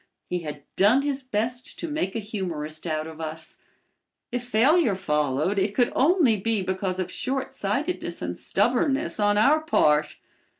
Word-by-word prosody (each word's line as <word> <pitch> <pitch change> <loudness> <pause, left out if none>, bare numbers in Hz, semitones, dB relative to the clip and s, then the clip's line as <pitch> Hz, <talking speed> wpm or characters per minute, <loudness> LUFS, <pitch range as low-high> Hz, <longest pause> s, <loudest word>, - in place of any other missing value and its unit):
He 180 - -2
had 150 -3 -7
done 220 +8 +4
his 280 -1 -1
best 245 0 -2
to 335 - -4
make 295 - -2
a - - 0
humorist 175 -7 -4
out 155 -1 -1
of 160 0 -9
us. 160 0 -5 0.7
If 245 0 -2
failure 245 - +3
followed 150 +2 0
it 200 +2 0
could 245 -2 +2
only 285 - +4
be 215 0 0
because 185 0 -2
of 185 -1 -3
shortsightedness 265 - -2
and 90 0 -4
stubbornness 255 - 0
on 205 0 +3
our 280 +9 +5
part. 150 - +2
205 Hz, 155 wpm, -25 LUFS, 165-255 Hz, 0.7 s, our